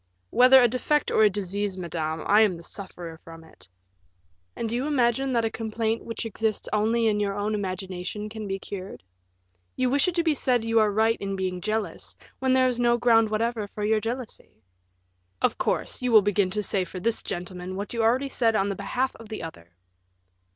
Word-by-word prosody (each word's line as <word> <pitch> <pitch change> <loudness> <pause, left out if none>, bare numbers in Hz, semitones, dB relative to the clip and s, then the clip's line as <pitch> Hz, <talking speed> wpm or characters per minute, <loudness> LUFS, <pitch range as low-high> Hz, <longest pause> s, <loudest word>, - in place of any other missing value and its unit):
"Whether 255 +2 +7
a - - +6
defect 255 +5 0
or - - +3
a 215 - +7
disease, 200 0 -3
madame, 160 -3 -3
I 210 +2 +5
am 200 -5 +3
the 170 - -12
sufferer 175 -4 -7
from 165 0 -12
it." 160 - -18 0.9
"And 230 - -3
do 220 - -4
you 255 +4 -1
imagine 265 -1 +1
that 230 -1 +2
a 225 - -1
complaint 225 0 -2
which 230 0 -5
exists 220 -1 -1
only 225 +2 +2
in 210 -2 +2
your 200 -1 -1
own 205 +1 -1
imagination 190 0 -4
can 215 -1 -7
be 195 0 -2
cured? 195 - -8 0.7
You 255 -1 +1
wish 280 +3 +3
it 360 - -1
to 340 - +2
be 320 -2 +3
said 250 -5 +1
you 225 0 +3
are 215 -1 +4
right 220 +2 +2
in 195 0 -3
being 185 -1 -3
jealous, 215 +1 -3 0.2
when 260 0 +2
there 260 0 +4
is 245 -1 -1
no 240 0 +3
ground 225 -2 +4
whatever 220 0 -1
for 210 +1 -6
your 220 +1 +3
jealousy." 230 - -6 0.8
"Of - - +1
course, - - -1
you 250 -1 0
will 215 -3 +7
begin 200 -1 +2
to 210 +2 -2
say 195 -1 0
for 185 +1 -7
this 225 +5 0
gentleman 180 0 -5
what 200 +4 -5
you 230 - -1
already 250 +5 +2
said 230 -4 +1
on 200 -1 +1
the 200 - -2
behalf 250 +7 -2
of 225 -2 -13
the 215 - -5
other." 85 - -10
215 Hz, 205 wpm, -26 LUFS, 195-235 Hz, 0.9 s, Whether